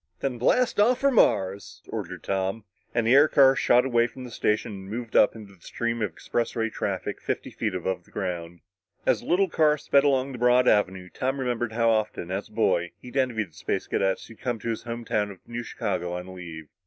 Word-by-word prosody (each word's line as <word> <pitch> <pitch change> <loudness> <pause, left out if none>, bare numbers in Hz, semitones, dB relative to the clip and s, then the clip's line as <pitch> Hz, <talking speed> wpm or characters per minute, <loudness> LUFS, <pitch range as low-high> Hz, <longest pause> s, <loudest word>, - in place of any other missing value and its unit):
"Then 125 -3 -2
blast 235 - +2
off 240 +4 +4
for 275 0 +4
Mars!" 100 - +1
ordered - - -6
Tom, 95 +2 -2 0.3
and 115 - 0
the 115 - +4
air 145 +3 +7
car 135 -2 +6
shot 125 -1 +4
away 120 -2 +3
from 130 +1 -11
the 125 - -9
station 110 +1 0
and 95 -1 -9
moved 115 +1 -6
up 105 - +5
into 105 -3 -11
the 90 - -23
stream 115 +3 -3
of 105 -4 0
expressway 115 -1 -2
traffic - - -3
fifty - - -3
feet 105 -5 -2
above 90 0 -3
the - - -23
ground. 85 -3 -5 0.4
As - - +3
the - - -12
little 190 +2 +3
car 155 -3 +3
sped 140 -1 +3
along 135 -1 +2
the 125 - -7
broad 125 +1 +4
avenue, 95 -3 +2
Tom 135 +2 -2
remembered 120 -3 -2
how 115 0 +3
often, 105 -5 -1
as 95 +2 -3
a - - -21
boy, 90 -6 +1
he'd 125 - -12
envied 120 -7 0
the - - -32
Space - - -3
Cadets 95 -1 0
who'd 115 - -15
come 120 -2 -1
to 115 - -3
his 115 - -2
home 120 0 -6
town 105 -2 0
of 95 -2 -13
New 120 0 -4
Chicago 90 -6 -3
on 90 +1 -6
leave. 85 -4 -8
115 Hz, 220 wpm, -26 LUFS, 95-125 Hz, 0.4 s, air